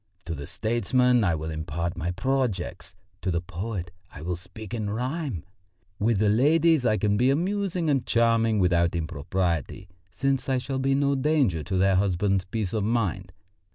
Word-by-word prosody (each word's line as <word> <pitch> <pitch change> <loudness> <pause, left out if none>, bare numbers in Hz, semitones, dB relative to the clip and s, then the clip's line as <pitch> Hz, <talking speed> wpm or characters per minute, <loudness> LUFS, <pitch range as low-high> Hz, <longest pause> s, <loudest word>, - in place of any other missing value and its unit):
To 85 - -3
the 70 -2 -6
statesmen 125 +2 +2
I 85 -5 +2
will 80 +1 -4
impart 80 +2 -3
my 85 0 -3
projects; 95 -4 -2 0.3
to - - -2
the 85 -1 +1
poet 90 +1 -5 0.2
I 75 - -10
will 90 +1 -2
speak 90 +4 -10
in 110 -3 -2
rhyme; 125 - -3 0.6
with 110 +1 +2
the 105 +2 +2
ladies 150 +5 +4
I 110 - +3
can 105 +1 +1
be 125 +4 +3
amusing 180 +3 0
and 140 -4 +2
charming 115 -1 +2
without 85 -3 +2
impropriety, 85 +2 -2 0.2
since 135 +4 -1
I 130 - +2
shall 130 +1 -3
be 135 +1 +2
no 140 0 +2
danger 135 - +2
to 95 - -1
their 95 0 +3
husbands' 95 0 +1
peace 100 -1 -3
of 110 -2 0
mind. 110 -5 -1
105 Hz, 170 wpm, -26 LUFS, 90-130 Hz, 0.6 s, ladies